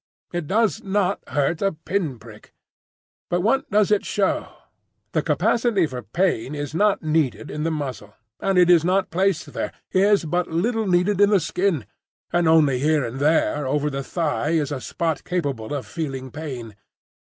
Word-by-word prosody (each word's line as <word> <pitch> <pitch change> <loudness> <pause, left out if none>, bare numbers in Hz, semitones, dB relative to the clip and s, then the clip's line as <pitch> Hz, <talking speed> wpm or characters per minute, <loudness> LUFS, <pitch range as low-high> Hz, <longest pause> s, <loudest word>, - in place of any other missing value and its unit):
It 175 -4 -3
does 215 -2 +1
not 195 0 0
hurt 145 +3 0
a 195 -1 +1
pin 165 -3 -2
prick. 110 -1 -15 0.7
But 175 0 +1
what 230 +8 +1
does 210 0 +3
it 210 - +3
show? 200 -3 0 0.6
The - - +1
capacity 225 -6 +2
for 130 -4 -5
pain 150 -5 -1
is 145 0 -5
not 205 +2 +2
needed 150 -9 0
in 150 - -4
the 165 - 0
muscle, 130 -10 -5 0.2
and 195 -1 0
it 180 -1 +6
is 175 -3 +6
not 185 +2 +1
placed 185 -1 0
there,—is 200 -1 +1
but 175 +3 0
little 220 +6 0
needed 185 +2 +2
in 205 - +6
the 205 -2 +4
skin, 170 - -1 0.5
and 175 -1 +3
only 150 -5 +4
here 150 -1 +2
and 120 +3 -5
there 150 -1 +2
over 145 +2 0
the 135 0 -3
thigh 150 0 -1
is 150 -3 0
a 135 -3 -3
spot 165 +1 -2
capable 140 -11 -3
of 145 -3 -3
feeling 135 -5 -5
pain. 125 -8 -7
160 Hz, 170 wpm, -23 LUFS, 140-190 Hz, 0.7 s, it